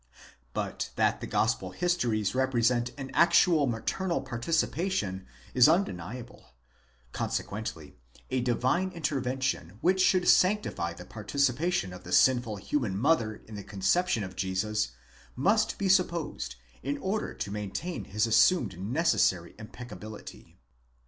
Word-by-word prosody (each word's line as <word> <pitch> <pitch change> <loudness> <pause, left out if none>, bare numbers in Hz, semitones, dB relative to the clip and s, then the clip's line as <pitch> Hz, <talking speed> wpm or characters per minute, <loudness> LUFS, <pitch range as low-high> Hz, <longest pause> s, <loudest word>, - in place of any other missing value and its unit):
But - - -3
that - - +1
the - - -4
gospel 95 - 0
histories 120 - 0
represent 125 -2 +2
an 135 -1 -6
actual 170 -3 +5
maternal 170 +10 -1
participation 135 - -1 0.3
is 125 +3 +7
undeniable; 120 - -2 0.6
consequently 100 -7 -4 0.4
a 130 -1 +1
divine 130 +9 +1
intervention 130 - -2
which 185 +5 +2
should 185 -1 +3
sanctify 185 - +3
the 90 +1 -11
participation 135 - 0
of 90 0 -10
the 90 - -9
sinful 120 0 +4
human 100 -1 -2
mother 115 -4 +1
in 110 - -11
the 100 -1 -6
conception 110 - +1
of 95 -1 -7
Jesus 95 +3 -1 0.5
must 200 - +2
be 200 - -1
supposed 170 - +1 0.3
in 140 +3 -2
order 195 +8 -2
to 100 - -4
maintain 105 - -4
his 105 +3 0
assumed 115 - +3
necessary 100 - +1
impeccability. 110 -1 -10
125 Hz, 120 wpm, -29 LUFS, 100-165 Hz, 0.6 s, is